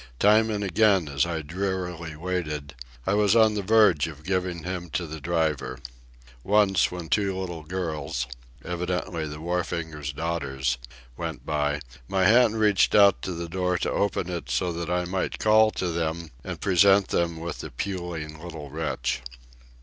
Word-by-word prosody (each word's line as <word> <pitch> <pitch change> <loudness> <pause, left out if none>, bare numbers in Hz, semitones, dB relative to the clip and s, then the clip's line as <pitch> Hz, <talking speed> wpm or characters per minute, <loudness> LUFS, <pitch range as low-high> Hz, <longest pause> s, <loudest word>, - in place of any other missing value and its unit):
Time 110 - +5
and 105 -1 -1
again, 95 -2 +3
as 70 +3 +1
I 80 -2 -3
drearily 90 -1 -3
waited, 75 -4 -3 0.3
I 95 - +1
was 105 +1 +3
on 110 -2 +6
the 105 - -1
verge 100 -7 +4
of 75 -2 -10
giving 90 -2 -1
him 90 -1 -4
to 90 - -1
the 80 -1 -7
driver. 80 -2 -1 0.7
Once, 100 -1 +3
when 90 -2 -6
two 100 +1 +1
little 90 -3 -5
girls—evidently 80 +2 -4
the 75 0 -7
wharfinger's 80 -3 -3
daughters—went 65 -6 -4
by, 75 -1 0 0.3
my 95 -1 +1
hand 115 0 +5
reached 105 -4 +4
out 100 -2 +6
to 95 - -3
the 85 0 -5
door 90 +1 0
to - - -1
open 100 -3 0
it 90 -2 -5
so 90 -2 0
that 85 0 -4
I 90 0 0
might 95 +1 -2
call 110 0 +5
to 90 - -2
them 80 -1 -2
and 90 -3 -6
present 100 0 +4
them 85 -1 0
with 85 0 -5
the - - -6
puling 85 -5 -5
little 80 -5 -8
wretch. 70 -5 -2
85 Hz, 155 wpm, -26 LUFS, 80-95 Hz, 0.7 s, on